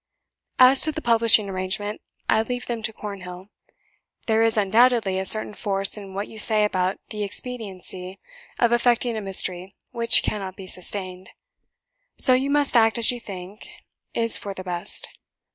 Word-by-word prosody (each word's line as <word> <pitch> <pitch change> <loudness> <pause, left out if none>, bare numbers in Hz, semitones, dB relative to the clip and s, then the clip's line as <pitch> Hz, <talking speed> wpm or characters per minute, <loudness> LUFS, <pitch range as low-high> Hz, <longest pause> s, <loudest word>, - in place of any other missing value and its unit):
As 255 +1 +6
to 310 - +4
the 310 - -6
publishing 230 -5 +3
arrangement, 195 +2 -4 0.3
I 220 - +2
leave 245 +2 -5
them 235 -2 -5
to 220 0 -2
Cornhill. 190 -3 -9 0.8
There 220 -1 +1
is, 225 -1 +2
undoubtedly, 215 -1 +2
a 190 - -3
certain 215 +1 +3
force 195 -2 -1
in 195 -2 -11
what 200 +1 -4
you 220 - -11
say 215 -1 +4
about 185 -2 -1
the 215 - -6
inexpediency 195 -4 -5 0.4
of 235 -1 +1
affecting 240 0 +1
a 220 - -4
mystery 185 -2 +2 0.2
which 230 0 +3
cannot 195 -3 -4
be 195 - -10
sustained; 185 0 -2 0.9
so 255 - +4
you 265 +2 0
must 285 -2 +2
act 225 0 +4
as 230 0 +2
you 245 - -7
think 195 -1 -10 0.5
is 230 -1 +4
for 200 -1 -7
the 185 - -8
best. 175 -1 0
210 Hz, 160 wpm, -23 LUFS, 190-235 Hz, 0.9 s, As